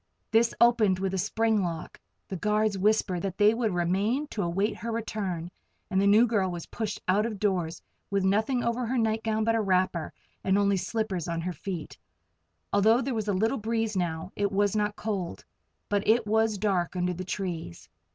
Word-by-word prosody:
This 230 +1 +3
opened 230 -5 +4
with 190 0 -2
a 190 - 0
spring 220 +2 +1
lock. 170 -3 -4 0.3
The 190 - -5
guards 210 +2 +1
whispered 195 -2 +1
that 195 -2 -4
they 210 +1 +5
would 225 -2 0
remain 195 - +1
to 210 - -3
await 195 +4 0
her 230 +2 -4
return, 195 -7 -3 0.4
and 190 0 +2
the 200 - +3
new 215 +4 +6
girl 210 -5 +1
was 175 -2 -5
pushed 215 -2 -4
out 195 +3 +3
of 220 -2 -3
doors, 185 -5 -1 0.3
with 200 -1 0
nothing 220 +6 +1
over 235 +1 -1
her 255 +2 0
nightgown 220 -1 0
but 225 +1 +2
a 225 - +2
wrapper, 185 -4 +1 0.3
and 190 +1 +2
only 200 -1 +3
slippers 195 -3 -2
on 170 -1 -2
her 180 +2 -3
feet. 170 - -6 0.7
Although 220 +4 +4
there 265 +1 -2
was 215 -2 -2
little 220 +6 +1
breeze 225 0 -1
now, 175 -1 -2
it 200 -1 0
was 205 +1 +1
not 210 -1 0
cold. 190 - -4 0.4
But 205 0 -1
it 225 +1 +4
was 220 0 +2
dark 190 -4 0
under 180 0 0
the 180 +1 -5
trees. 175 - -5
205 Hz, 190 wpm, -28 LUFS, 185-220 Hz, 0.7 s, new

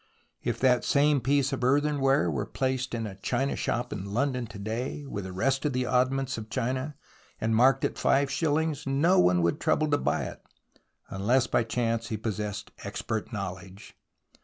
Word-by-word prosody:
If - - -2
that 125 -2 +4
same 145 -1 +3
piece 135 +2 +2
of 130 - -3
earthenware 135 - +2
were 70 - -2
placed 130 -1 -1
in 115 -1 -2
a 95 -3 -7
china 130 +7 0
shop 120 +1 -2
in 100 +1 -6
London 125 -2 0
to 105 - -10
day 115 +8 -4
with 100 -8 -5
the 95 - -6
rest 130 +9 0
of 150 -3 0
the 125 0 0
oddments 130 +1 +1
of 110 0 -9
china, 130 +4 -2 0.4
and 110 0 +1
marked 130 +4 +4
at - - -3
five 140 0 +3
shil 155 +1 0
lings, 155 -2 -1
no 145 +7 +3
one 90 -1 +4
would 85 - +1
trouble 155 -1 +1
to 145 - +3
buy - - 0
it, - - -7 0.7
unless 115 +7 +2
by - - +1
chance 115 -1 -1
he 110 - -3
possessed 105 -1 -4
expert 110 +2 -4
knowledge. 95 -1 -7
125 Hz, 185 wpm, -28 LUFS, 110-135 Hz, 0.7 s, that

